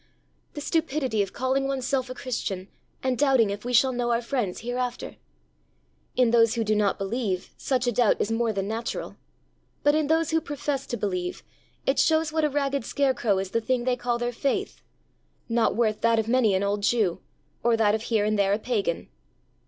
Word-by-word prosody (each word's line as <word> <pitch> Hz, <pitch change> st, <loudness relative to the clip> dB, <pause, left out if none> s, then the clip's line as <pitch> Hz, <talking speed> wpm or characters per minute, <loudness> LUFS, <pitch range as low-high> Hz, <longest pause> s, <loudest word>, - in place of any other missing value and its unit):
The 295 Hz, -, -5 dB
stupidity 290 Hz, -8 st, 0 dB
of 195 Hz, -1 st, -2 dB
calling 265 Hz, +2 st, 0 dB
oneself 265 Hz, -1 st, -1 dB
a 255 Hz, -, -6 dB
Christian, 195 Hz, -7 st, -4 dB, 0.3 s
and 260 Hz, -1 st, +1 dB
doubting 265 Hz, -7 st, +4 dB
if 205 Hz, +1 st, -5 dB
we 245 Hz, -, -3 dB
shall 255 Hz, +2 st, +4 dB
know 240 Hz, -1 st, -1 dB
our 235 Hz, 0 st, +2 dB
friends 230 Hz, -7 st, -2 dB
hereafter! 245 Hz, +1 st, -3 dB, 1.0 s
In 250 Hz, -2 st, +3 dB
those 230 Hz, 0 st, +4 dB
who 230 Hz, -, 0 dB
do 215 Hz, 0 st, +1 dB
not 210 Hz, -1 st, +2 dB
believe, 195 Hz, -2 st, -3 dB
such 255 Hz, -2 st, -1 dB
a 245 Hz, -, +2 dB
doubt 235 Hz, -1 st, +3 dB
is 215 Hz, -, 0 dB
more 225 Hz, 0 st, +1 dB
than 195 Hz, -2 st, -2 dB
natural, 225 Hz, +2 st, -4 dB, 0.7 s
but 290 Hz, -, +5 dB
in 310 Hz, -1 st, +1 dB
those 320 Hz, 0 st, +2 dB
who 325 Hz, 0 st, +2 dB
profess 285 Hz, -1 st, -3 dB
to 240 Hz, -, -3 dB
believe, 180 Hz, -4 st, -3 dB, 0.4 s
it 270 Hz, -, +2 dB
shows 315 Hz, -1 st, +2 dB
what 315 Hz, -1 st, +1 dB
a 300 Hz, -, +3 dB
ragged 280 Hz, -2 st, -1 dB
scarecrow 245 Hz, -7 st, +1 dB
is 190 Hz, 0 st, -3 dB
the 230 Hz, -, +1 dB
thing 245 Hz, +2 st, 0 dB
they 250 Hz, 0 st, +1 dB
call 245 Hz, -1 st, -1 dB
their 240 Hz, 0 st, -2 dB
faith 275 Hz, +3 st, -2 dB, 0.7 s
not 230 Hz, -1 st, +1 dB
worth 220 Hz, -2 st, +1 dB
that 230 Hz, 0 st, +3 dB
of 220 Hz, -1 st, 0 dB
many 230 Hz, -4 st, +3 dB
an 190 Hz, -, +1 dB
old 205 Hz, +1 st, 0 dB
Jew, 205 Hz, -5 st, +1 dB, 0.4 s
or 235 Hz, -1 st, +3 dB
that 210 Hz, -2 st, +3 dB
of 220 Hz, -, 0 dB
here 220 Hz, -2 st, +1 dB
and 215 Hz, -1 st, +1 dB
there 200 Hz, 0 st, +3 dB
a -, -, +2 dB
pagan! 210 Hz, -7 st, -2 dB
240 Hz, 200 wpm, -26 LUFS, 215-265 Hz, 1.0 s, but